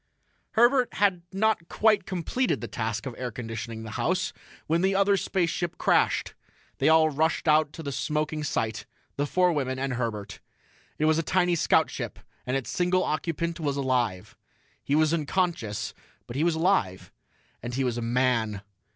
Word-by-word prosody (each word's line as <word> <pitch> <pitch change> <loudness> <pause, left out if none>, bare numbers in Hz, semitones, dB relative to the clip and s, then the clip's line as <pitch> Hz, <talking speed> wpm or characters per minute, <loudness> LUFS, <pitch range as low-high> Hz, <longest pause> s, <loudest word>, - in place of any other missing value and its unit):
Herbert 245 +2 +4
had 195 -3 +2
not 195 -3 +1
quite 215 -3 +2
completed 195 +8 -1
the - - -5
task 110 0 -3
of 130 - -4
air 125 -1 -2
conditioning 115 -1 -6
the 110 - -7
house 185 +2 0 0.3
when 165 +2 +1
the 190 +1 +2
other 200 +1 +4
spaceship 175 -3 -1
crashed. - - +2 0.5
They 140 - +4
all 160 0 +5
rushed 160 +3 0
out 155 -1 +4
to 165 - -8
the 140 - -3
smoking 150 +3 -2
site 110 -6 -2 0.3
the 145 +1 -1
four 180 +2 +3
women 130 -3 -1
and 135 0 -2
Herbert. 105 -5 -4 0.6
It 155 - +1
was 160 +1 +3
a - - +2
tiny 180 +1 +2
scoutship, 170 - +1 0.3
and 130 +2 +1
its 135 - -5
single 180 +1 +2
occupant 170 +2 -2
was 145 -3 -1
alive. 125 -9 -1 0.5
He 140 - 0
was 155 +1 +3
unconscious, 165 - -1 0.3
but 120 - -8
he 145 - +1
was 170 -1 +2
alive. 160 - 0 0.5
And 120 +1 -5
he 135 - 0
was 120 -2 -1
a - - -4
man! 115 -4 0
155 Hz, 170 wpm, -27 LUFS, 125-175 Hz, 0.6 s, all